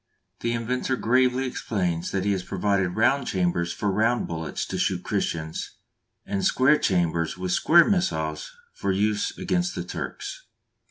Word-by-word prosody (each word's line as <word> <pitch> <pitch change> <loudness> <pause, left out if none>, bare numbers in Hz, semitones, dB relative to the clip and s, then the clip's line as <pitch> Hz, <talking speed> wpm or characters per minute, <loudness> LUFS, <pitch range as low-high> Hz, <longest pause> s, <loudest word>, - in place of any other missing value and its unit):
The 115 - -1
inventor 125 +3 -1
gravely 130 +2 +2
explains 90 -9 -2
that 95 0 -2
he 100 - +2
has 95 -2 0
provided 95 -1 0
round 130 +4 +2
chambers 85 -2 0
for 105 - -1
round 115 +4 +1
bullets 80 -1 -4
to - - -4
shoot - - 0
Christians, 80 -1 -3 0.5
and 100 -1 -2
square 130 +4 +4
chambers 85 -3 0
with 90 0 -3
square 170 - +6
missiles 80 - -1 0.2
for 100 - -2
use 105 +2 0
against 180 0 -1
the - - -3
Turks! - - -6
100 Hz, 150 wpm, -25 LUFS, 90-125 Hz, 0.5 s, square